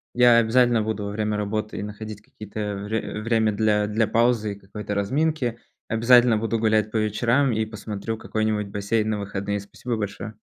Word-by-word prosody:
Я 120 -1 +6
обязательно 120 0 +4
буду 105 -1 -2
во 100 - -4
время 105 0 -1
работы 105 0 -3
находить 105 0 -7
какие-то 105 -1 -6
вре 105 0 -3
время 110 -1 +2
для 105 0 +2
для 105 +1 +1
паузы 115 -3 +2
и 100 - -12
какой-то 105 +1 -6
разминки. 125 +2 0 0.3
Обязательно 120 0 +5
буду 115 +1 -1
гулять 110 -1 +2
по 110 - -2
вечерам 115 +6 +2
и 110 -1 0
посмотрю 110 0 -5
какой-нибудь 110 -2 -1
бассейн 105 +2 -1
на 105 -1 -1
выходные. 100 0 -3
Спасибо 115 +4 -5
большое. 105 +1 -5
110 Hz, 165 wpm, -24 LUFS, 105-115 Hz, 0.3 s, Я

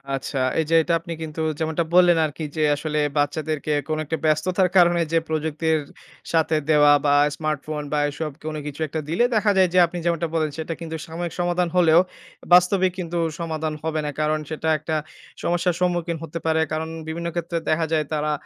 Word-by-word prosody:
আচ্ছা, 135 +1 -5 0.2
এই 160 - +1
যে, 165 - +3
এটা 170 - 0
আপনি 170 +1 -7
কিন্তু 160 0 -5 0.2
যেমনটা 160 +1 0
বললেন 175 -2 +6
আরকি 155 +1 -6
যে, 155 - -1
আসলে 150 +1 -2 0.2
বাচ্চাদেরকে 155 +1 -1 0.2
কোন 155 -1 -1
একটা 160 +2 -2
ব্যস্ততার 180 +5 +2
কারণে 175 -1 +5
যে, 165 - +3
প্রযুক্তির 160 0 0 0.5
সাথে 160 -1 +2
দেওয়া 145 -1 +6
বা 145 - +4 0.2
স্মার্টফোন 155 0 -3
বা 150 - +2
এসব 150 +1 -4
কোনো 155 -1 -3
কিছু 145 0 -7
একটা 155 +2 -4
দিলে 170 +9 +2
দেখা 210 -1 +3
যায় 185 -1 +5
যে, - - +2
আপনি 170 +1 -7
যেমনটা 170 -1 0
বলেন 155 -1 +1
সেটা 160 +1 -3
কিন্তু 160 -1 -5
সাময়িক 170 +1 -5
সমাধান 175 0 +1
হলেও, 170 -2 +6 0.5
বাস্তবিক 185 +1 +5
কিন্তু 175 -1 -3 0.2
সমাধান 160 -2 -3
হবে 160 -1 -1
না। 150 - -2
কারণ 155 0 +1
সেটা 160 0 -2
একটা 155 +1 -3 0.5
সমস্যার 175 0 +1
সম্মুখীন 175 -2 0
হতে 165 +1 -5
পারে 160 0 +2
কারণ 160 +1 -2 0.2
বিভিন্ন 170 +2 -4
ক্ষেত্রে 170 0 -2
দেখা 160 +1 +2
যায় 155 -2 +1
তারা 150 0 0
160 Hz, 185 wpm, -23 LUFS, 155-170 Hz, 0.5 s, বললেন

